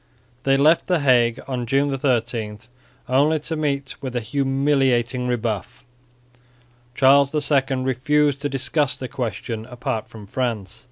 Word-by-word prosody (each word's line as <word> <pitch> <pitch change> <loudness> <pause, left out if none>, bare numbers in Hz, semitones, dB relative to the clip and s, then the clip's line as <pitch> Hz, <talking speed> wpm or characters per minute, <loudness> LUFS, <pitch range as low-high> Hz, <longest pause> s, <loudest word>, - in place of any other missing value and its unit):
They 135 0 +4
left 155 +4 +4
the 180 -4 +1
Hague 120 -4 +3
on 125 -3 -3
June 140 +2 +1
13, 115 -5 -1 0.5
only 145 +5 +3
to 160 - -4
meet 140 -3 -2
with 130 -2 -5
a - - +1
humiliating 135 -2 +1
rebuff. 115 -5 -3 1.1
Charles 140 +2 +4 0.2
II 135 -1 +2
refused 140 +2 +1
to 145 - -1
discuss 140 +1 0
the 130 - -5
question 115 -2 -4
apart 125 -3 -4
from 110 -2 -12
France. 110 -4 -3
130 Hz, 130 wpm, -22 LUFS, 120-140 Hz, 1.1 s, They